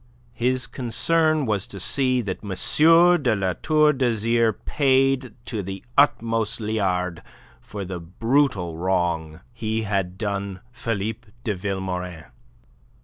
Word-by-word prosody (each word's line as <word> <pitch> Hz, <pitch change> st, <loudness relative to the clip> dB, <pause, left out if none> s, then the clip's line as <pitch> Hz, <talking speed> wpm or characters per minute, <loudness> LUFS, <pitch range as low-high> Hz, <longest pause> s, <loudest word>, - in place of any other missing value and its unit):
His 125 Hz, +2 st, 0 dB
concern 155 Hz, +5 st, +1 dB
was 105 Hz, -4 st, -1 dB
to 100 Hz, -, -8 dB
see 130 Hz, +4 st, +1 dB
that 100 Hz, -3 st, -5 dB
M. 160 Hz, -, +4 dB
de 120 Hz, -5 st, +2 dB
La 95 Hz, -2 st, 0 dB
Tour 155 Hz, -1 st, +4 dB
d'Azyr 115 Hz, -3 st, +1 dB
paid 135 Hz, -4 st, +2 dB
to 110 Hz, -4 st, -3 dB
the 95 Hz, 0 st, -7 dB
uttermost 115 Hz, -6 st, +2 dB
liard 90 Hz, -5 st, -1 dB, 0.4 s
for 100 Hz, -2 st, -7 dB
the 90 Hz, -1 st, -5 dB
brutal 95 Hz, -, 0 dB
wrong 85 Hz, -3 st, -1 dB
he 110 Hz, -1 st, -2 dB
had 95 Hz, -3 st, -2 dB
done 100 Hz, -2 st, -3 dB
Philippe 115 Hz, -2 st, -4 dB, 0.2 s
de 110 Hz, -, 0 dB
Vilmorin. 90 Hz, -4 st, -4 dB
110 Hz, 120 wpm, -23 LUFS, 95-130 Hz, 0.4 s, M